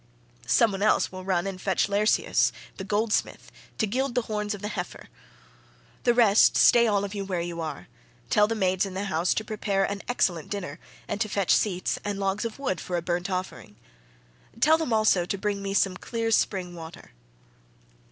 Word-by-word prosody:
Some 230 - +4
one 195 0 -5
else 215 - +2
will 185 0 -8
run 185 -2 0
and 190 -1 -5
fetch 190 -1 +1
Laerceus 205 +2 +2 0.3
the 190 - -5
goldsmith 210 +3 -1 0.3
to 220 - +1
gild 255 +4 -2
the 245 - +1
horns 210 -1 -3
of 205 - -12
the - - -2
heifer. - - -6 1.0
The 240 -1 +4
rest, 225 -4 +5
stay 235 -1 +6
all 205 -2 +1
of 200 - -7
you 200 -1 -3
where 190 -3 -3
you 170 -1 -4
are; 155 -3 -6 0.4
tell 210 0 +5
the 225 - -2
maids 185 -3 +1
in 195 -2 -5
the 195 - -2
house 175 -3 0
to 220 - -1
prepare 205 -2 -1
an 200 +1 -2
excellent 175 -10 0
dinner, 180 -7 -5 0.3
and 205 - -3
to 215 - 0
fetch 200 -2 +2
seats, 185 -4 0
and 205 -1 -3
logs 195 +3 -1
of 230 - -5
wood 260 -10 -2
for 180 - -3
a 170 - -3
burnt 175 +1 -2
offering. 185 - -5 0.8
Tell 315 +5 +5
them 320 -7 -2
also 215 -5 +3
to 190 +3 -3
bring 200 0 -2
me 195 0 -3
some 195 -2 +2
clear 230 +3 -3
spring 185 -4 0
water." 165 - -11
200 Hz, 195 wpm, -26 LUFS, 185-215 Hz, 1.0 s, stay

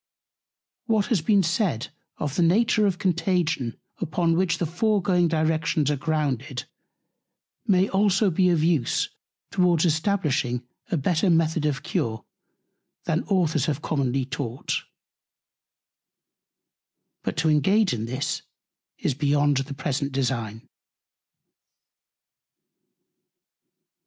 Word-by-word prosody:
What 220 -3 +2
has 190 - +2
been 200 +3 +3
said 170 - 0 0.3
of 145 -1 -3
the - - +1
Nature 210 +5 +3
of 185 -3 -1
Contagion, 170 - 0 0.2
upon 165 -2 0
which 180 -1 +1
the 175 - -1
foregoing 180 0 +1
Directions 155 -2 +1
are - - +1
grounded, 140 -3 -2 1.0
may 190 -2 +4
also 200 0 +2
be 180 +2 +3
of 165 -3 +2
Use 160 -8 +1 0.4
towards 180 -3 +3
establishing 150 - 0 0.2
a 180 - 0
better 165 +6 +1
Method 160 -2 +2
of 140 -3 -2
Cure, 110 -1 -2 0.8
than 160 - 0
Authors 165 - +1
have 150 -1 -2
commonly 135 -3 0
taught: 130 -1 -4 2.5
But - - -4
to 160 0 +2
engage 190 +7 +3
in 110 -2 -3
this 130 +4 -3 0.6
is - - -1
beyond 145 0 +2
the 135 +1 -3
present 140 0 -2
Design. 120 -5 -2
160 Hz, 105 wpm, -25 LUFS, 140-180 Hz, 2.5 s, may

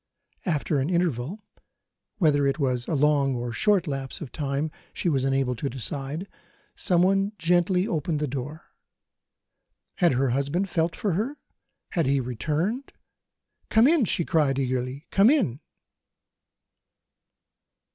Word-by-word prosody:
After 150 -3 0
an 135 +4 -1
interval 175 - -1 0.7
whether 145 -7 +3
it 135 - 0
was 125 -5 -1
a 160 - 0
long 140 -2 +3
or 120 0 -3
a - - -7
short 195 - +2
lapse 135 -3 -4
of 150 -7 -7
time 145 +1 -2 0.2
she - - -2
was 135 -4 +1
unable 135 -2 +1
to 140 +4 -3
decide 140 - -3 0.5
someone 195 +3 +2
gently 180 +3 +2
opened 155 -1 -1
the 150 - 0
door. 140 +4 -6 1.3
Had 175 -5 +4
her 130 0 +1
husband 140 +9 0
felt 165 0 0
for 205 - -1
her? 235 - -2 0.5
Had 165 -6 0
he 140 0 +3
returned? 155 - -2 0.8
"Come 225 +3 +5
in! 310 -5 +4
she 170 -3 0
cried 145 -5 +2
eagerly 130 +2 -2
" - - -52
come 200 +4 +5
in! 235 - +2
150 Hz, 135 wpm, -26 LUFS, 135-180 Hz, 1.3 s, Come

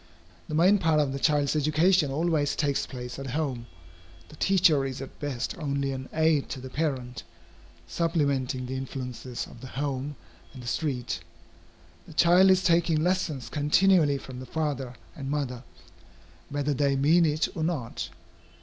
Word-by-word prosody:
The 155 - -3
main 185 +6 +5
part 160 -3 +3
of 140 -3 +1
the 140 - -3
child's 145 -1 +2
education 155 +2 +3
always 150 0 +1
takes 140 -2 0
place 125 0 -7
at 135 - -5
home. 130 -7 -2 0.6
The - - -12
teacher 180 -7 +4
is 135 -1 -4
at 135 - -9
best 130 -5 -3
only 140 -2 -1
an 130 0 -6
aid 160 -3 +2
to 135 - -5
the 130 0 -9
parent, 130 -5 -2 0.6
supplementing 140 - 0
the 130 +1 -4
influences 125 -2 -5
of 115 - -14
the 130 - -8
home 140 0 -2 0.4
and 125 - -10
the - - -8
street. 125 - -2 0.9
The - - -11
child 175 +4 +6
is 185 0 +4
taking 165 -2 +3
lessons 165 -7 0
continually 150 0 +3
from 130 -2 -9
the 130 - -8
father 140 -4 -2 0.2
and 135 -2 -6
mother, 135 -4 -2 0.9
whether 145 0 -1
they 140 0 +1
mean 155 +6 +4
it 155 0 +2
or 160 - -2
not. 150 -8 -3
145 Hz, 160 wpm, -27 LUFS, 130-160 Hz, 0.9 s, child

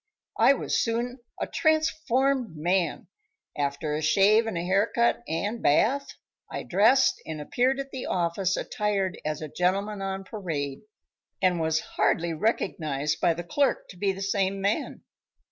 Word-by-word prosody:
I - - +7
was - - -1
soon 240 +2 -2 0.2
a - - -1
transformed 275 - +1
man. 175 +1 0 0.5
After 145 +1 -2
a 150 - -1
shave 205 +8 +4
and 220 - -3
hair 190 +5 +1
cut 235 0 +2
and 205 +8 -2
bath, 270 - +2 0.4
I - - -4
dressed 220 +9 +3
and 160 -1 -6
appeared 250 - 0
at 270 0 -5
the 260 - -5
office 180 +2 0
attired 205 -5 -1
as 155 0 -3
a - - -4
gentleman 195 +6 -1
on 195 0 -3
parade, 160 -10 -4 0.6
and 180 -2 +2
was 160 0 +1
hardly 170 0 0
recognized 155 -6 -1
by 175 -3 +3
the 175 - -5
clerk 275 +11 0
to - - -11
be 195 +2 +1
the 195 +1 -5
same 195 0 0
man. 200 +2 -1
195 Hz, 150 wpm, -27 LUFS, 165-230 Hz, 0.6 s, I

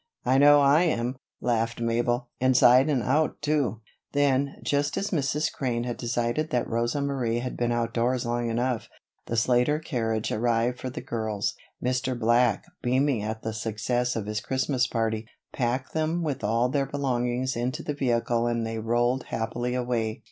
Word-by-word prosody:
"I 130 +1 +4
know 145 0 +7
I 140 +3 +5
am," 125 -5 0 0.3
laughed 115 -1 0
Mabel. 120 +1 0
"Inside 130 +1 +5
and 130 -6 +1
out, 150 +5 +1
too." 145 -7 0 0.3
Then, 140 -1 +2
just 145 0 0
as 200 - -2
Mrs. 150 -2 0
Crane 120 -3 -1
had 120 -1 -4
decided 120 +5 -1
that 125 -4 0
Rosa 120 +5 -1
Marie 130 -5 -1
had 125 +1 -3
been 120 0 0
outdoors 120 +1 0
long 120 0 -1
enough, 120 -1 -1 0.4
the 115 - -2
Slater 125 +5 +3
carriage 115 -8 -2
arrived 120 +2 +1
for 130 - -4
the 125 - -6
girls. 110 -3 -2 0.3
Mr. 125 0 -1
Black, 120 +1 +3 0.2
beaming 130 -1 +1
at 110 +1 -4
the 110 - -3
success 120 +3 -1
of 110 -3 -2
his 105 0 -3
Christmas 130 0 0
party, 110 -1 -1 0.3
packed 130 +1 -1
them 160 +2 0
with 145 -4 -3
all 115 +4 +2
their 135 +1 0
belongings 130 -2 -1
into 130 +7 -2
the 150 - -2
vehicle 120 -3 0
and 115 -1 0
they 115 0 -3
rolled 120 +3 +1
happily 120 +2 -2
away. 120 -3 -1
120 Hz, 165 wpm, -26 LUFS, 115-135 Hz, 0.4 s, know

